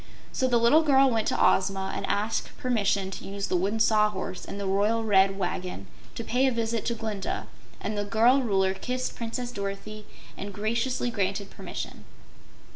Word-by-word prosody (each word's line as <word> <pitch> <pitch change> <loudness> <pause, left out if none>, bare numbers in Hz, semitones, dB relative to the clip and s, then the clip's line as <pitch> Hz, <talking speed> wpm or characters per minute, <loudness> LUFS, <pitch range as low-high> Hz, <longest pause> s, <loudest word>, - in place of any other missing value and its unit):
So 260 - +1
the 245 -2 +3
little 235 +7 +5
girl 275 -3 +5
went 225 -2 0
to - - +1
Ozma 190 0 +2
and - - -3
asked 210 +2 -1
permission 200 -6 0
to - - -7
use 200 0 -4
the - - +1
Wooden 200 +5 0
Sawhorse 210 -4 +1
and 200 - -6
the 200 - -3
royal 205 +4 +1
Red 195 -2 +4
Wagon 180 - -3 0.3
to 230 - -4
pay 255 +4 +2
a - - +2
visit 230 -2 -1
to 235 - 0
Glinda, 215 -4 -3 0.3
and 215 - -3
the 205 - -1
girl 230 +6 +4
Ruler 190 -5 +2
kissed 250 +6 -3
Princess 240 +1 -4
Dorothy 205 +1 -6 0.3
and 200 -1 -7
graciously 235 +4 -1
granted 200 -1 -2
permission. - - -7
215 Hz, 175 wpm, -27 LUFS, 195-235 Hz, 0.3 s, little